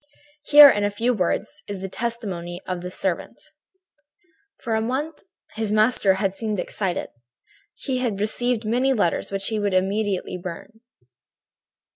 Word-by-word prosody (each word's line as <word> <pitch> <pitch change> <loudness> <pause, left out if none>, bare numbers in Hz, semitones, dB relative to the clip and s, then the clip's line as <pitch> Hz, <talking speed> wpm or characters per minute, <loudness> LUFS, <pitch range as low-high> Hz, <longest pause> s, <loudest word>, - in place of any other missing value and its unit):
"Here, 295 0 +10
in 210 -7 +3
a 205 - +2
few 230 +5 0
words, 185 -6 -2
is 200 -2 -5
the 195 - -3
testimony 190 -6 -4
of 180 -1 -4
the 180 - -5
servant: 185 -1 -3 1.2
"For 230 - -4
a 220 - +1
month 275 +7 -3 0.3
his 220 -1 -2
master 215 -2 +3
had 190 -1 -1
seemed 215 -1 -3
excited. 190 -2 -3 0.7
He 260 -3 -3
had 230 -6 -2
received 230 +2 -1
many 250 +5 +2
letters, 200 -8 0
which 195 0 -2
he 220 -1 -1
would 200 -2 0
immediately 195 -1 -1
burn. 185 +5 -8
210 Hz, 145 wpm, -23 LUFS, 190-235 Hz, 1.2 s, Here